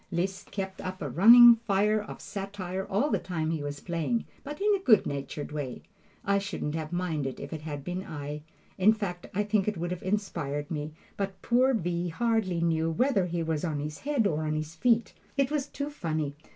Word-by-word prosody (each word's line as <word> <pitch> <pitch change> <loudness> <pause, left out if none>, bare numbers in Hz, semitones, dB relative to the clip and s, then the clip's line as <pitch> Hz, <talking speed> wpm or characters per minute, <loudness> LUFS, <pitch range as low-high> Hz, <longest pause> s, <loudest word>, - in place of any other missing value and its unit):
Liszt 190 +2 -2
kept 190 -1 -5
up 185 0 -5
a 145 - -3
running 235 - +9
fire 210 -1 +2
of 210 - -9
satire 195 -1 -5
all 215 +10 +1
the - - +2
time 160 -3 -2
he 160 -2 -2
was 145 0 -4
playing, 170 - -1 0.2
but 295 +1 -7
in 415 +1 +3
a 400 - +2
good 235 - +5
natured 140 +2 -4
way. 145 -5 -5 0.4
I 200 0 +3
shouldn't 195 -7 -3
have 160 -1 -4
minded 160 -7 -2
it - - -6
if - - -7
it 155 - -5
had 145 -2 -6
been 180 +3 -4
I. 150 -3 -6 0.4
In 205 +4 +6
fact, 185 -5 -4
I 210 - +2
think 210 -1 +1
it 210 -3 0
would 175 +1 -3
have 180 - -4
inspired 165 -8 -2
me; 150 -1 -3 0.2
but 195 -1 -3
poor 255 +2 +3
V. 175 -3 -1
hardly 215 -3 0
knew 165 -1 +1
whether 195 - +2
he 170 -1 -2
was 160 -2 -1
on 155 -4 -1
his 150 +1 -5
head 280 -6 0
or 155 -5 +1
on 155 0 -1
his 155 +1 -4
feet. 230 +6 +2 0.2
It 275 0 +2
was 290 -2 0
too 285 +1 -5
funny. 155 - -2
180 Hz, 210 wpm, -28 LUFS, 155-215 Hz, 0.4 s, running